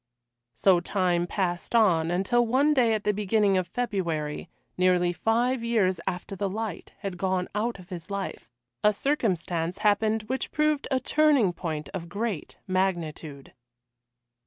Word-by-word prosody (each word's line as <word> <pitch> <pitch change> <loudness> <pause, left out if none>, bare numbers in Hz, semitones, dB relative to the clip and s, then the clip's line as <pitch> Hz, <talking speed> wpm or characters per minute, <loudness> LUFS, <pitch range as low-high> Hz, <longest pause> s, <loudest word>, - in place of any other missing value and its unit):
So 180 +9 +4
time 175 -2 0
passed 180 +2 -2
on, 170 -8 +4
until 195 +8 +2
one 265 +6 +3
day 235 -5 +3
at 210 - -3
the 210 - +2
beginning 205 0 +2
of 185 -1 0
February, 170 -9 -2 0.3
nearly 180 -1 +3
five 235 +5 +1
years 205 -7 +1
after 180 +2 -3
the 195 +1 -2
light 215 -2 -5
had 190 -3 -5
gone 185 -1 0
out 220 +2 -1
of 180 -1 -14
his 180 -1 -7
life, 200 -10 -5 0.3
a 210 - +5
circumstance 180 - -1
happened 215 +1 +2
which 260 +5 -3
proved 305 -1 +1
a 265 -2 +1
turning 280 -8 +3
point 155 -3 -4
of 170 -3 -5
great 200 -3 -4
magnitude. 170 -6 -2
195 Hz, 145 wpm, -27 LUFS, 175-225 Hz, 0.3 s, a